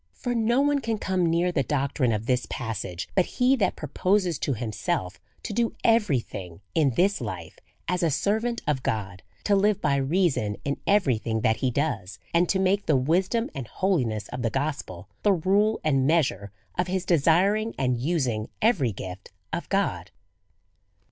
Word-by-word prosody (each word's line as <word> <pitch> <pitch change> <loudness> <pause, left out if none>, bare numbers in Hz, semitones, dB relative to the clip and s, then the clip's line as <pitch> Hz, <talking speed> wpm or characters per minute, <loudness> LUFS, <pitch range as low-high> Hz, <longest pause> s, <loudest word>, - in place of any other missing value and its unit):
For 245 - -3
no 235 +3 +2
one 290 0 +2
can 225 -2 -1
come 185 -3 0
near 170 +2 +2
the 160 - +1
doctrine 135 -2 0
of 110 0 -2
this 125 0 0
passage 105 -7 -4
but 185 - +3
he 255 +2 +4
that 195 -6 +1
proposes 180 +3 0
to 140 - -1
himself 110 -2 -3 0.2
to - - -4
do 230 +1 0
every 215 - +3
thing 90 -6 -8
in 140 -7 +2
this 195 0 +2
life 95 -8 -6 0.3
as 180 +1 0
a 170 - +3
servant 220 - 0
of 150 -4 0
God, 100 -6 -3 0.2
to 205 - +3
live 200 0 +3
by 140 -2 +1
reason 135 - +1
in 140 0 -1
everything 120 - +2
that 110 -1 +2
he 130 - 0
does, 125 -8 -2 0.2
and 170 +1 +3
to 195 - +2
make 190 +2 +1
the 150 -4 +4
wisdom 185 - +1
and 135 -4 -6
holiness 125 - 0
of 125 - -5
the 115 - +1
gospel 135 - -3
the 205 - +4
rule 200 +5 +2
and 135 -4 +2
measure 130 - +1 0.3
of 180 - +1
his 185 0 -2
desiring 185 +7 +3
and 125 -2 0
using 130 -8 -1
every 185 - +2
gift 95 0 -8 0.2
of - - -3
God. - - 0
155 Hz, 175 wpm, -26 LUFS, 120-195 Hz, 0.3 s, he